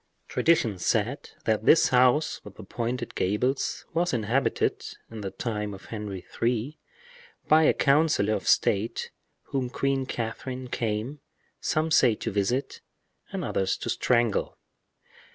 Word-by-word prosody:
Tradition 135 Hz, -, +2 dB
said -, -, 0 dB, 0.2 s
that 110 Hz, -1 st, +1 dB
this 160 Hz, -, +6 dB
house 130 Hz, +4 st, +3 dB
with -, -, -12 dB
the -, -, -10 dB
pointed 120 Hz, 0 st, -3 dB
gables 115 Hz, +8 st, -1 dB
was 175 Hz, 0 st, +1 dB
inhabited, 120 Hz, +3 st, 0 dB, 0.3 s
in 110 Hz, -1 st, -7 dB
the 100 Hz, -, -3 dB
time 105 Hz, -2 st, -4 dB
of 95 Hz, -, -14 dB
Henry 105 Hz, -4 st, -5 dB, 0.2 s
III., 120 Hz, +5 st, 0 dB, 0.7 s
by 155 Hz, +1 st, +6 dB
a -, -, +5 dB
councilor 140 Hz, -7 st, +3 dB
of -, -, -3 dB
state 110 Hz, +4 st, +1 dB, 0.4 s
whom 130 Hz, -2 st, -1 dB
Queen 135 Hz, +1 st, -1 dB
Catherine 125 Hz, +2 st, -4 dB
came, 115 Hz, +6 st, -2 dB, 0.4 s
some 155 Hz, +1 st, 0 dB
say 125 Hz, -7 st, +5 dB
to -, -, -4 dB
visit, 105 Hz, +7 st, -1 dB, 0.5 s
and -, -, -3 dB
others 95 Hz, -1 st, 0 dB
to -, -, -3 dB
strangle. 120 Hz, -3 st, +1 dB
120 Hz, 135 wpm, -27 LUFS, 105-135 Hz, 0.7 s, this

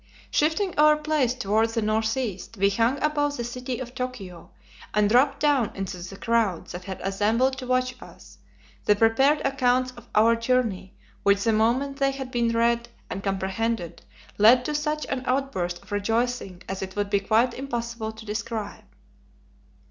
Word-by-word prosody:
Shifting 325 Hz, +6 st, +1 dB
our 300 Hz, 0 st, +6 dB
place 300 Hz, -5 st, 0 dB
toward 220 Hz, -1 st, +1 dB
the 225 Hz, 0 st, -1 dB
northeast, 220 Hz, -1 st, -1 dB
we 200 Hz, +1 st, +3 dB
hung 230 Hz, +6 st, +2 dB
above 290 Hz, -1 st, +1 dB
the 240 Hz, -, -3 dB
city 250 Hz, +1 st, -4 dB
of 245 Hz, 0 st, -7 dB
Tokio 235 Hz, -9 st, -6 dB, 0.5 s
and 210 Hz, -1 st, +4 dB
dropped 250 Hz, +7 st, +3 dB
down 285 Hz, -6 st, +2 dB
into 195 Hz, -1 st, -4 dB
the 185 Hz, +2 st, -8 dB
crowds 225 Hz, -7 st, 0 dB
that 180 Hz, +1 st, -7 dB
had 190 Hz, -1 st, -6 dB
assembled 225 Hz, +7 st, +1 dB
to 255 Hz, -, -7 dB
watch 255 Hz, 0 st, +1 dB
us, -, -, -14 dB, 0.5 s
the 210 Hz, -, +5 dB
prepared 265 Hz, +8 st, +3 dB
accounts 255 Hz, -2 st, +2 dB
of 240 Hz, -1 st, -15 dB
our 230 Hz, +2 st, +5 dB
journey, 230 Hz, -5 st, -1 dB, 0.3 s
which, 200 Hz, 0 st, +3 dB
the 225 Hz, -, +2 dB
moment 250 Hz, +6 st, +1 dB
they 275 Hz, -1 st, +2 dB
had 270 Hz, -1 st, -6 dB
been 235 Hz, -1 st, +1 dB
read 235 Hz, +1 st, +1 dB, 0.2 s
and 195 Hz, -, -4 dB
comprehended, 195 Hz, 0 st, -2 dB, 0.4 s
led 245 Hz, +4 st, +6 dB
to 300 Hz, -, -2 dB
such 300 Hz, +1 st, -1 dB
an 265 Hz, -2 st, -3 dB
outburst 190 Hz, -10 st, -1 dB
of -, -, -19 dB
rejoicing 215 Hz, -2 st, -1 dB
as 190 Hz, 0 st, -4 dB
it 190 Hz, 0 st, -6 dB
would 205 Hz, -1 st, -2 dB
be 200 Hz, -, +3 dB
quite 225 Hz, +5 st, +2 dB
impossible 235 Hz, -4 st, -4 dB
to 220 Hz, 0 st, -12 dB
describe. 215 Hz, 0 st, -5 dB
230 Hz, 165 wpm, -25 LUFS, 205-255 Hz, 0.5 s, our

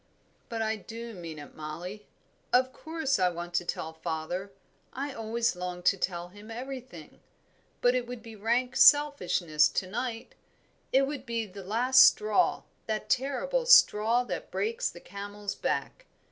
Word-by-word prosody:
"But 225 Hz, -1 st, -2 dB
I 220 Hz, 0 st, -1 dB
do 230 Hz, +2 st, -8 dB
mean 170 Hz, -5 st, -8 dB
it, 145 Hz, -, -11 dB
Mollie. 175 Hz, +7 st, -7 dB, 0.4 s
Of 255 Hz, +1 st, +3 dB
course 315 Hz, -6 st, -2 dB
I 180 Hz, -1 st, +4 dB
want 175 Hz, 0 st, -7 dB
to 175 Hz, -, +1 dB
tell 160 Hz, -1 st, -4 dB
father 165 Hz, +4 st, -4 dB, 0.4 s
I 275 Hz, +1 st, -4 dB
always 230 Hz, 0 st, -1 dB
long 180 Hz, 0 st, -5 dB
to 200 Hz, -, +4 dB
tell 175 Hz, -2 st, -3 dB
him 205 Hz, +4 st, -14 dB
everything, 255 Hz, +2 st, -8 dB, 0.6 s
but 245 Hz, 0 st, +4 dB
it 250 Hz, -1 st, -1 dB
would 245 Hz, -2 st, -7 dB
be 225 Hz, -2 st, -10 dB
rank 240 Hz, +4 st, 0 dB
selfishness 180 Hz, -, +5 dB
to 190 Hz, -, -2 dB
night; 230 Hz, +4 st, -5 dB, 0.6 s
it 270 Hz, +1 st, +4 dB
would 280 Hz, -2 st, -4 dB
be 230 Hz, -1 st, -1 dB
the 195 Hz, -1 st, -10 dB
last 250 Hz, +7 st, +5 dB
straw, 215 Hz, 0 st, +3 dB, 0.2 s
that 215 Hz, -1 st, -3 dB
terrible 480 Hz, -, 0 dB
straw 240 Hz, -, +6 dB
that -, -, -5 dB
breaks 465 Hz, +3 st, -1 dB
the -, -, -12 dB
camel's 205 Hz, 0 st, -6 dB
back. -, -, -3 dB
225 Hz, 155 wpm, -29 LUFS, 185-255 Hz, 0.6 s, straw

